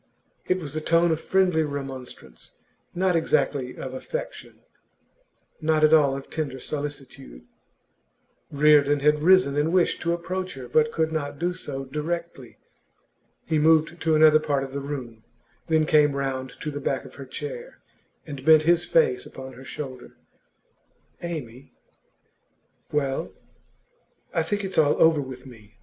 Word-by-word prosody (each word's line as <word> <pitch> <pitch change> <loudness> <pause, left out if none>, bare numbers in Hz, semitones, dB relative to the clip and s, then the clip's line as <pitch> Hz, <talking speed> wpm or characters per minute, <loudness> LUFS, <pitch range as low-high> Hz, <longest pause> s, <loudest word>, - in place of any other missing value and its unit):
It 185 - +2
was 150 -6 -7
the 155 - -3
tone 165 +2 +3
of 160 0 -1
friendly 185 -4 +2
remonstrance, 135 - -7 0.4
not 180 0 +1
exactly 140 -5 0
of 130 - -6
affection, 480 - -7 1.0
not 155 0 +2
at 155 +1 +5
all 140 -4 +4
of 135 - -9
tender 140 -5 -4
solicitude. 140 - -7 1.1
Reardon 145 -1 +4
had 150 +1 +3
risen 180 -3 +4
and 150 +3 +1
wished 180 -1 +2
to 170 - 0
approach 185 +1 -4
her, 130 -2 -8
but 155 +5 +2
could 160 0 0
not 145 -3 -3
do 175 +3 -1
so 135 -6 -6
directly. 150 -2 -5 0.9
He 160 -2 +1
moved 160 +2 +3
to 160 -1 +2
another 155 0 +6
part 140 -3 -1
of 135 - -7
the 140 - -3
room, 125 -6 -7 0.4
then 160 -1 +2
came 150 -2 +4
round 130 -2 -4
to 150 - -3
the 145 0 -6
back 135 -1 -2
of - - -12
her 135 - -9
chair, 475 - -7 0.5
and 140 -4 -8
bent 155 +1 +6
his 170 +1 +3
face 460 -5 +2
upon 130 0 -10
her 125 +2 -12
shoulder. 130 -2 -8 1.1
'Amy 140 -7 -7 0.6
' - - -42
'Well.' 140 -2 -2 1.0
'I - - +2
think 205 -1 -2
it's 190 -3 -1
all 150 -2 +3
over 160 -2 +5
with 130 -1 -9
me. 110 -3 -15
150 Hz, 150 wpm, -25 LUFS, 135-165 Hz, 1.1 s, another